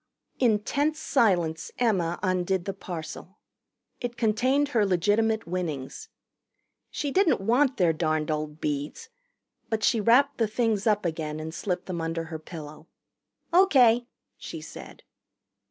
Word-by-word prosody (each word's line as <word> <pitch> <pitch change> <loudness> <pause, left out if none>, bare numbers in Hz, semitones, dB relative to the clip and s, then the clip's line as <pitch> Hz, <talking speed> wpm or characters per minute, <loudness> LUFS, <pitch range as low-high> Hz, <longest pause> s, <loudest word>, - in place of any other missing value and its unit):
In 230 -5 +4
tense 290 +8 -1
silence 175 - +1
Emma 185 -8 +1
undid 185 -1 0
the 195 - -3
parcel. 175 +1 -8 0.6
It 240 -1 -5
contained 255 +6 +2
her 230 -6 +2
legitimate 205 +4 +1
winnings. 165 -7 -4 0.8
She 290 -1 -3
didn't 375 +2 +3
want 250 +7 +2
their 175 -4 +3
darned 155 -1 0
old 150 0 -3
beads, 150 - -4 0.6
but 220 -1 -1
she 230 -3 +3
wrapped 265 +6 +4
the 225 - +3
things 220 -1 0
up 210 -3 +2
again 155 -2 -3
and 160 +1 -6
slipped 180 0 -3
them 175 -3 -4
under 165 0 -2
her 160 -1 -7
pillow. 155 -1 -10 0.7
"O.K.," 250 -10 +5 0.3
she - - -7
said. - - -11
195 Hz, 135 wpm, -26 LUFS, 165-235 Hz, 0.8 s, O.K